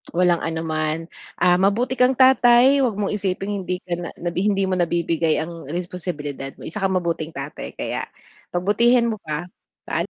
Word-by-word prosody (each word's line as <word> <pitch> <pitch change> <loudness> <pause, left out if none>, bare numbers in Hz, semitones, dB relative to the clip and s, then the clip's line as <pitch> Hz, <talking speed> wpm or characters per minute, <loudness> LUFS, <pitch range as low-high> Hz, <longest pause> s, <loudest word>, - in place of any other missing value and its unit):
Walang 175 -1 +3
anuman. 160 -1 -1 0.4
Ah, 180 0 +4
mabuti 215 +7 +2
kang 250 +1 +4
tatay. 260 +1 +6
'Wag 250 -6 +1
mong 200 -1 -1
isiping 195 -1 -2
hindi 180 0 -4
ka 180 - -4
na 175 - -5
na 175 - -3
hindi 195 +2 +1
mo 190 -1 0
nabibigay 170 -2 +1
ang 165 -3 -9
responsibilidad 155 -5 -5
mo, - - -14
isa 190 - -5
kang 195 -1 0
mabuting 170 -3 -2
tatay 140 +2 -7
kaya - - -3 0.4
pagbutihin 235 +6 +3
mo 215 - -4
pa. 155 +2 -4 0.4
Paala - - -1
180 Hz, 165 wpm, -22 LUFS, 165-210 Hz, 0.4 s, tatay